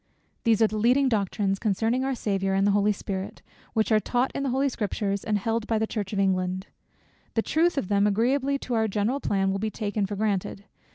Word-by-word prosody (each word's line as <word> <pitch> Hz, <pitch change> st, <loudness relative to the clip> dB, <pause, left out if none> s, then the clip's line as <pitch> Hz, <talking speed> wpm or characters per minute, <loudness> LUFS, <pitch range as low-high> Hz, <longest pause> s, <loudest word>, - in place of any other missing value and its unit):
These 225 Hz, -1 st, +4 dB
are -, -, +6 dB
the 215 Hz, 0 st, -3 dB
leading 255 Hz, +5 st, +4 dB
Doctrines 200 Hz, -2 st, 0 dB
concerning 225 Hz, +4 st, 0 dB
our 270 Hz, 0 st, -1 dB
Saviour, 195 Hz, -4 st, -1 dB
and 195 Hz, +1 st, +2 dB
the 205 Hz, -, +4 dB
Holy 205 Hz, +1 st, +3 dB
Spirit, 190 Hz, -1 st, -5 dB, 0.3 s
which 220 Hz, 0 st, +1 dB
are 215 Hz, -, +5 dB
taught 245 Hz, +4 st, 0 dB
in -, -, -3 dB
the 275 Hz, -, -1 dB
Holy 265 Hz, +3 st, +1 dB
Scriptures, 205 Hz, -4 st, -2 dB
and 215 Hz, -1 st, 0 dB
held 225 Hz, +2 st, -2 dB
by 225 Hz, -, +1 dB
the 220 Hz, -, +1 dB
Church 210 Hz, -3 st, -4 dB
of 205 Hz, -, -3 dB
England. 185 Hz, -1 st, 0 dB, 0.7 s
The 225 Hz, -, +2 dB
truth 335 Hz, +1 st, +1 dB
of 240 Hz, -, -1 dB
them, 200 Hz, +1 st, +3 dB
agreeably 265 Hz, +7 st, +1 dB
to 250 Hz, -, -4 dB
our 220 Hz, -1 st, +2 dB
general 215 Hz, +6 st, 0 dB
plan, 195 Hz, -6 st, 0 dB
will 195 Hz, -, -2 dB
be 215 Hz, +2 st, -1 dB
taken 205 Hz, -1 st, -2 dB
for 205 Hz, -, -4 dB
granted. 200 Hz, -1 st, -2 dB
215 Hz, 220 wpm, -26 LUFS, 195-235 Hz, 0.7 s, are